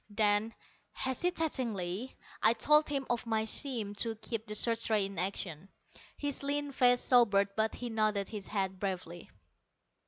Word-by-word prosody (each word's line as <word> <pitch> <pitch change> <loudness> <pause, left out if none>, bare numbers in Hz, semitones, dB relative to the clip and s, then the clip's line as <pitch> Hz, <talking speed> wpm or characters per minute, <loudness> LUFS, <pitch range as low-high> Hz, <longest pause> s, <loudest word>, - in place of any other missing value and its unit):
Then, 210 +1 +2 0.4
hesitatingly, 255 - -2 0.3
I 225 - +5
told 300 +7 +3
him 275 -2 -2
of 240 -1 -2
my 220 -1 0
scheme 220 -3 +1
to 225 0 +2
keep 220 0 -5
the 210 - -4
search 230 +1 +2
rays 210 -3 +3
in 195 -3 -6
action. 185 -2 -3 0.5
His 285 -2 -3
lean 285 0 -2
face 245 -2 +3
sobered, 205 -6 +4
but 220 0 0
he 245 -1 -6
nodded 215 -3 0
his 210 -3 -7
head 190 -2 -2
bravely. 180 -3 -5
220 Hz, 150 wpm, -31 LUFS, 200-250 Hz, 0.5 s, I